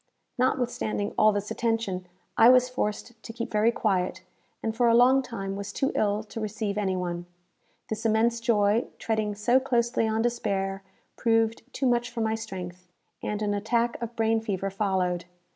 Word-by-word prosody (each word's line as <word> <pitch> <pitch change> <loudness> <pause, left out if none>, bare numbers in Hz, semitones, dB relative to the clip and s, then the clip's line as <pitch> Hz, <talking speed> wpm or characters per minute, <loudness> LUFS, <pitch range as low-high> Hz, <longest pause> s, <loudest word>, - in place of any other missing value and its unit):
Notwithstanding 245 -5 0
all 215 0 +5
this 205 0 -3
attention, 225 -6 -1 0.3
I 230 - +7
was 250 0 +5
forced 225 -1 -3
to 225 - -8
keep 235 +1 -5
very 215 +2 +3
quiet, 185 -4 -1 0.4
and 225 -1 -1
for 240 +1 +3
a 230 - +5
long 255 +3 +6
time 195 -6 -5
was 200 +1 -5
too 270 +6 0
ill 210 +1 +1
to 220 +1 -8
receive 215 -1 -3
any 195 -3 0
one. 175 -1 -3 0.6
This 220 0 -4
immense 225 +1 +2
joy, 225 -1 +2
treading 215 -2 -1
so 240 +5 +3
closely 235 -3 +1
on 220 +1 0
despair, 200 -5 -1 0.4
proved 225 -1 +2
too 270 - -2
much 240 -1 +2
for 235 -1 -4
my 220 0 +1
strength, 185 -5 -6 0.3
and 210 0 -3
an 205 -1 0
attack 230 +4 0
of 235 0 -5
brain 225 0 +2
fever 195 -3 -2
followed. 185 -3 0
220 Hz, 170 wpm, -27 LUFS, 200-235 Hz, 0.6 s, I